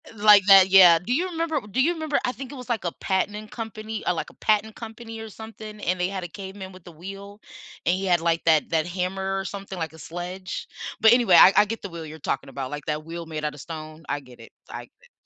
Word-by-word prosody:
Like 205 Hz, -2 st, +6 dB
that, 195 Hz, -1 st, +8 dB
yeah. 180 Hz, -3 st, +8 dB
Do 230 Hz, +8 st, -3 dB
you 365 Hz, +6 st, 0 dB
remember 330 Hz, -3 st, -1 dB
do 260 Hz, +6 st, +1 dB
you 330 Hz, -, +3 dB
remember 315 Hz, -3 st, -1 dB
I 250 Hz, -, 0 dB
think 260 Hz, 0 st, -9 dB
it -, -, -8 dB
was, 250 Hz, -1 st, -10 dB
like, 225 Hz, -6 st, -2 dB
a 170 Hz, -, -2 dB
patenting 210 Hz, +3 st, -1 dB
company 220 Hz, -1 st, -6 dB
or, 180 Hz, -, +3 dB
like, 165 Hz, -, -4 dB
a -, -, -18 dB
patent 215 Hz, 0 st, 0 dB
company 225 Hz, 0 st, -9 dB
or 225 Hz, -, -7 dB
something, 215 Hz, -1 st, -10 dB
and 180 Hz, 0 st, -1 dB
they 180 Hz, -, +1 dB
had 190 Hz, -1 st, -5 dB
a 175 Hz, -, -6 dB
caveman 190 Hz, 0 st, -9 dB
with 185 Hz, -1 st, -15 dB
the 175 Hz, -, -11 dB
wheel, 195 Hz, +5 st, -10 dB, 0.4 s
and 175 Hz, -, +3 dB
he 195 Hz, +1 st, -3 dB
had, 175 Hz, -3 st, +2 dB
like, 165 Hz, 0 st, 0 dB
that 160 Hz, -2 st, +3 dB
that 160 Hz, -1 st, +1 dB
hammer 190 Hz, +2 st, -2 dB
or 195 Hz, -, -2 dB
something 195 Hz, 0 st, -7 dB
like 165 Hz, -2 st, -3 dB
a 160 Hz, -, -14 dB
sledge? 180 Hz, +3 st, -6 dB, 0.3 s
But 220 Hz, -, +7 dB
anyway, 235 Hz, -7 st, +5 dB
I 190 Hz, -, +9 dB
I 210 Hz, -, +7 dB
get 225 Hz, +2 st, -5 dB
the 200 Hz, -, -6 dB
wheel 165 Hz, -2 st, -8 dB
you're 155 Hz, +1 st, -10 dB
talking 135 Hz, -1 st, -3 dB
about, 135 Hz, -1 st, -6 dB
like 145 Hz, -1 st, -6 dB
that 150 Hz, 0 st, -3 dB
wheel 165 Hz, +1 st, -7 dB
made 155 Hz, -1 st, -6 dB
out 150 Hz, -, -2 dB
of 145 Hz, -, -12 dB
stone. 155 Hz, 0 st, -9 dB
I 145 Hz, 0 st, -2 dB
get 125 Hz, -3 st, -16 dB
it. -, -, -14 dB, 0.2 s
I -, -, -7 dB
get 485 Hz, 0 st, -29 dB
190 Hz, 260 wpm, -24 LUFS, 170-220 Hz, 0.4 s, I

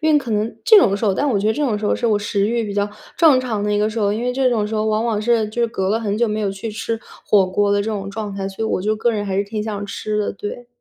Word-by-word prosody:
因 315 Hz, -1 st, +3 dB
为 295 Hz, -, +6 dB
可 260 Hz, -4 st, -6 dB
能 215 Hz, +1 st, -1 dB
这 440 Hz, -4 st, +8 dB
种 210 Hz, -, +4 dB
的 200 Hz, -, 0 dB
时 215 Hz, -, -3 dB
候， 200 Hz, -3 st, +2 dB
但 290 Hz, -, 0 dB
我 215 Hz, -, +1 dB
觉 205 Hz, -, -1 dB
得 220 Hz, -, +3 dB
这 295 Hz, -, -1 dB
种 220 Hz, -6 st, 0 dB
时 210 Hz, -, -2 dB
候 -, -, +2 dB
是 240 Hz, -, -1 dB
我 210 Hz, -2 st, +3 dB
食 205 Hz, -1 st, 0 dB
欲 235 Hz, 0 st, 0 dB
比 205 Hz, -1 st, -5 dB
较 205 Hz, 0 st, 0 dB, 0.3 s
正 300 Hz, -7 st, +5 dB
常 220 Hz, -5 st, -2 dB
的 210 Hz, -, 0 dB
一 205 Hz, -, +1 dB
个 210 Hz, -, +2 dB
时 220 Hz, +1 st, -4 dB
候， 205 Hz, -1 st, +2 dB
因 220 Hz, -, -3 dB
为 250 Hz, 0 st, 0 dB
这 260 Hz, 0 st, +2 dB
种 220 Hz, -4 st, +1 dB
时 220 Hz, -, -4 dB
候 215 Hz, 0 st, 0 dB
往 215 Hz, +1 st, +1 dB
往 225 Hz, -3 st, 0 dB
是 225 Hz, -1 st, +1 dB
就 235 Hz, +3 st, -2 dB
是 235 Hz, -, +2 dB
隔 190 Hz, -3 st, -2 dB
了 220 Hz, +3 st, +1 dB
很 205 Hz, -2 st, -1 dB
久 235 Hz, -, +3 dB
没 215 Hz, +1 st, -2 dB
有 200 Hz, -, 0 dB
去 195 Hz, +3 st, -5 dB
吃 225 Hz, +1 st, -3 dB, 0.3 s
火 195 Hz, -3 st, +4 dB
锅 200 Hz, +2 st, +1 dB
的 205 Hz, -, +2 dB
这 200 Hz, -, -2 dB
种 195 Hz, -2 st, -4 dB
状 210 Hz, 0 st, -5 dB
态， 195 Hz, -1 st, -3 dB
所 195 Hz, +3 st, -4 dB
以 220 Hz, -, -1 dB
我 -, -, -1 dB
就 215 Hz, +2 st, +1 dB
个 235 Hz, +2 st, +1 dB
人 205 Hz, -1 st, -2 dB
还 195 Hz, -1 st, -2 dB
是 200 Hz, -, +1 dB
挺 210 Hz, +1 st, -4 dB
想 205 Hz, -2 st, -4 dB
吃 210 Hz, +1 st, -3 dB
的， 210 Hz, -, -1 dB
对。 205 Hz, +4 st, -7 dB
215 Hz, 385 characters per minute, -20 LUFS, 205-230 Hz, 0.3 s, 这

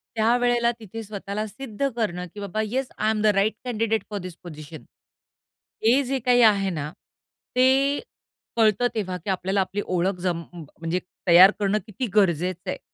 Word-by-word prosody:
त्यावेळेला 240 Hz, +1 st, +2 dB
तिथे 225 Hz, +1 st, -8 dB
स्वतःला 205 Hz, +1 st, -5 dB
सिद्ध 265 Hz, +3 st, -3 dB
करणं 180 Hz, -6 st, -2 dB
की 205 Hz, -, -9 dB
"बाबा 200 Hz, +2 st, -3 dB
yes, 255 Hz, +4 st, -2 dB
I 215 Hz, +1 st, +1 dB
am 215 Hz, -1 st, -1 dB
the -, -, 0 dB
right 210 Hz, +2 st, +2 dB
candidate 225 Hz, -2 st, 0 dB
for 205 Hz, -, -4 dB
this 180 Hz, -2 st, -8 dB
position." 155 Hz, -2 st, -10 dB, 1.0 s
हे 245 Hz, +5 st, +5 dB
जे 265 Hz, +1 st, -2 dB
काही 245 Hz, 0 st, +3 dB
आहे 200 Hz, -3 st, +4 dB
ना, 155 Hz, -4 st, -4 dB, 0.6 s
ते 265 Hz, +3 st, +3 dB, 0.6 s
कळतं 220 Hz, +1 st, +4 dB
तेव्हा 185 Hz, -4 st, -2 dB
की 180 Hz, +3 st, -8 dB
आपल्याला 190 Hz, +1 st, 0 dB
आपली 200 Hz, +2 st, -2 dB
ओळख 185 Hz, +1 st, 0 dB
जम 170 Hz, -2 st, -1 dB
म्हणजे 165 Hz, +2 st, -4 dB, 0.3 s
तयार 180 Hz, +3 st, +9 dB
करणं 205 Hz, +1 st, +1 dB
किती 225 Hz, +5 st, -4 dB
गरजेचं 180 Hz, -1 st, +1 dB
आहे. -, -, -3 dB
205 Hz, 160 wpm, -24 LUFS, 180-230 Hz, 1.0 s, तयार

